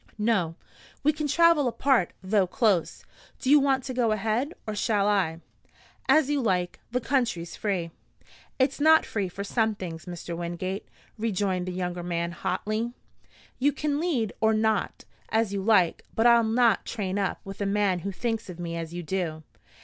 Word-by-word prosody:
"No. 205 Hz, -7 st, +1 dB, 0.5 s
We 300 Hz, +2 st, +4 dB
can 300 Hz, 0 st, -2 dB
travel 335 Hz, -2 st, +4 dB
apart, 245 Hz, -5 st, +2 dB
though 190 Hz, 0 st, +2 dB
close. 205 Hz, -5 st, +1 dB, 0.3 s
Do 260 Hz, -, 0 dB
you 295 Hz, -, +8 dB
want 270 Hz, -2 st, +2 dB
to 260 Hz, -, -5 dB
go 240 Hz, -3 st, +1 dB
ahead, 220 Hz, +7 st, 0 dB
or 215 Hz, -, -3 dB
shall 205 Hz, -1 st, +1 dB
I?" 180 Hz, -6 st, +1 dB, 0.7 s
"As 310 Hz, -3 st, +5 dB
you 290 Hz, -1 st, +1 dB
like. 180 Hz, -6 st, 0 dB
The 250 Hz, +1 st, 0 dB
country's 230 Hz, -10 st, -1 dB
free." 185 Hz, -5 st, -2 dB, 0.7 s
"It's 260 Hz, +2 st, +1 dB
not 315 Hz, +2 st, +6 dB
free 200 Hz, -4 st, -2 dB
for 200 Hz, +3 st, -6 dB
some 220 Hz, +1 st, 0 dB
things, 165 Hz, -5 st, -7 dB
Mr. 175 Hz, -1 st, -6 dB
Wingate," 175 Hz, +3 st, -4 dB, 0.3 s
rejoined 190 Hz, -4 st, -1 dB
the -, -, -2 dB
younger 180 Hz, -1 st, -3 dB
man 170 Hz, 0 st, -2 dB
hotly. 215 Hz, +6 st, -2 dB, 0.7 s
"You 285 Hz, +3 st, +3 dB
can 295 Hz, -1 st, -1 dB
lead 275 Hz, -, 0 dB
or 220 Hz, 0 st, +4 dB
not, 220 Hz, -1 st, 0 dB, 0.2 s
as 220 Hz, -2 st, +1 dB
you 200 Hz, -, -1 dB
like; 190 Hz, -5 st, +3 dB
but 225 Hz, -, +2 dB
I'll 235 Hz, -1 st, +7 dB
not 225 Hz, -1 st, +3 dB
train 200 Hz, -3 st, -3 dB
up 195 Hz, -, -1 dB
with 195 Hz, +1 st, -8 dB
a 200 Hz, -, 0 dB
man 200 Hz, -2 st, +1 dB
who 200 Hz, +4 st, -4 dB
thinks 225 Hz, +1 st, -3 dB
of 175 Hz, -1 st, -8 dB
me 170 Hz, -1 st, -4 dB
as 165 Hz, 0 st, -5 dB
you 175 Hz, -, -4 dB
do. 160 Hz, -2 st, -3 dB
210 Hz, 175 wpm, -27 LUFS, 180-240 Hz, 0.7 s, you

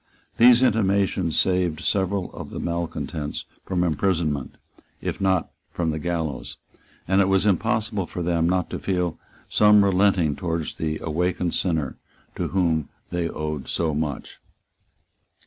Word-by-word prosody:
These 120 Hz, +1 st, +7 dB
intimations 100 Hz, -7 st, +2 dB
saved 90 Hz, -3 st, +1 dB
several 95 Hz, 0 st, 0 dB
of -, -, -7 dB
the -, -, -6 dB
malecontents 85 Hz, -3 st, -3 dB, 0.2 s
from 90 Hz, -2 st, +1 dB
imprisonment, 80 Hz, -4 st, 0 dB, 0.4 s
if -, -, -4 dB
not 95 Hz, -2 st, +1 dB, 0.2 s
from 85 Hz, -2 st, -1 dB
the 80 Hz, -, -3 dB
gallows; 80 Hz, -5 st, -3 dB, 0.5 s
and 95 Hz, +2 st, +4 dB
it 95 Hz, -, +3 dB
was 95 Hz, 0 st, +3 dB
impossible 105 Hz, -1 st, +1 dB
for 90 Hz, -, -4 dB
them 85 Hz, -1 st, +1 dB
not 90 Hz, -1 st, 0 dB
to -, -, -3 dB
feel 90 Hz, -3 st, -1 dB, 0.3 s
some 105 Hz, -1 st, +5 dB
relenting 95 Hz, -5 st, +3 dB
towards 85 Hz, -3 st, -3 dB
the 80 Hz, -1 st, -1 dB
awakened 90 Hz, +2 st, -1 dB
sinner 80 Hz, -7 st, -1 dB, 0.4 s
to -, -, -2 dB
whom 85 Hz, -5 st, +1 dB, 0.2 s
they 85 Hz, -1 st, -1 dB
owed 75 Hz, -3 st, -4 dB
so 80 Hz, -2 st, 0 dB
much. 75 Hz, -1 st, -4 dB
90 Hz, 135 wpm, -24 LUFS, 80-95 Hz, 0.5 s, These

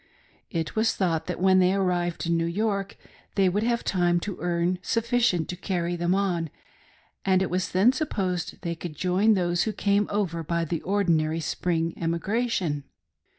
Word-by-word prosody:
It 165 Hz, -3 st, -3 dB
was 220 Hz, +1 st, +2 dB
thought 170 Hz, -5 st, 0 dB
that -, -, -3 dB
when 185 Hz, 0 st, +5 dB
they 185 Hz, +1 st, +4 dB
arrived 175 Hz, -3 st, 0 dB
in 170 Hz, 0 st, +1 dB
New 165 Hz, 0 st, +1 dB
York 200 Hz, +2 st, -1 dB, 0.4 s
they 195 Hz, -2 st, +4 dB
would 195 Hz, +3 st, +1 dB
have 235 Hz, +1 st, 0 dB
time 175 Hz, -2 st, +2 dB
to 200 Hz, 0 st, -5 dB
earn 175 Hz, +1 st, 0 dB
sufficient 230 Hz, -7 st, +1 dB
to 180 Hz, -, -3 dB
carry 175 Hz, -2 st, -2 dB
them 175 Hz, +1 st, +1 dB
on, 180 Hz, -5 st, 0 dB, 0.7 s
and 190 Hz, -1 st, +3 dB
it 190 Hz, -, -3 dB
was 185 Hz, +1 st, 0 dB
then 200 Hz, +8 st, +4 dB
sup 310 Hz, +2 st, -2 dB
posed 180 Hz, -3 st, -2 dB
they 170 Hz, -2 st, -1 dB
could 165 Hz, -1 st, -7 dB
join 185 Hz, +6 st, +3 dB
those 175 Hz, -2 st, +1 dB
who 220 Hz, -, -1 dB
came 200 Hz, 0 st, +1 dB
over 190 Hz, -5 st, -1 dB
by 170 Hz, +1 st, -1 dB
the 165 Hz, +1 st, -3 dB
ordinary 165 Hz, -5 st, +1 dB
spring 165 Hz, 0 st, -1 dB
emigration. 170 Hz, -, -1 dB
180 Hz, 175 wpm, -26 LUFS, 170-200 Hz, 0.7 s, when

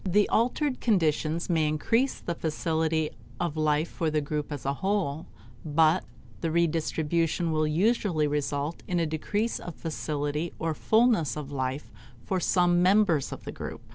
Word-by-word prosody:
The 205 Hz, +3 st, +3 dB
altered 255 Hz, +4 st, +1 dB
conditions 165 Hz, -5 st, +1 dB
may 160 Hz, -3 st, +2 dB
increase 230 Hz, -, +1 dB
the 170 Hz, -, -3 dB
facility 160 Hz, -1 st, -1 dB, 0.3 s
of 170 Hz, -3 st, -1 dB
life 155 Hz, +1 st, +1 dB
for 165 Hz, -2 st, -2 dB
the 155 Hz, 0 st, +1 dB
group 150 Hz, +1 st, -3 dB
as 145 Hz, -2 st, -5 dB
a 140 Hz, -, +1 dB
whole, 185 Hz, -6 st, -1 dB, 0.4 s
but 160 Hz, +3 st, +3 dB, 0.4 s
the 165 Hz, -, -1 dB
redistribution 165 Hz, 0 st, 0 dB
will 155 Hz, -1 st, +1 dB
usually 175 Hz, -1 st, +2 dB
result 145 Hz, +1 st, -2 dB
in 180 Hz, -1 st, 0 dB
a 165 Hz, -, +2 dB
decrease 205 Hz, +9 st, -1 dB
of 175 Hz, -, -8 dB
facility 150 Hz, 0 st, -3 dB
or 165 Hz, 0 st, -1 dB
fullness 220 Hz, -, +2 dB
of 145 Hz, -2 st, -6 dB
life 130 Hz, +1 st, -3 dB, 0.3 s
for 185 Hz, -, 0 dB
some 175 Hz, -1 st, +3 dB
members 180 Hz, -6 st, +3 dB
of -, -, -7 dB
the -, -, -6 dB
group. -, -, -7 dB
160 Hz, 155 wpm, -27 LUFS, 150-180 Hz, 0.4 s, The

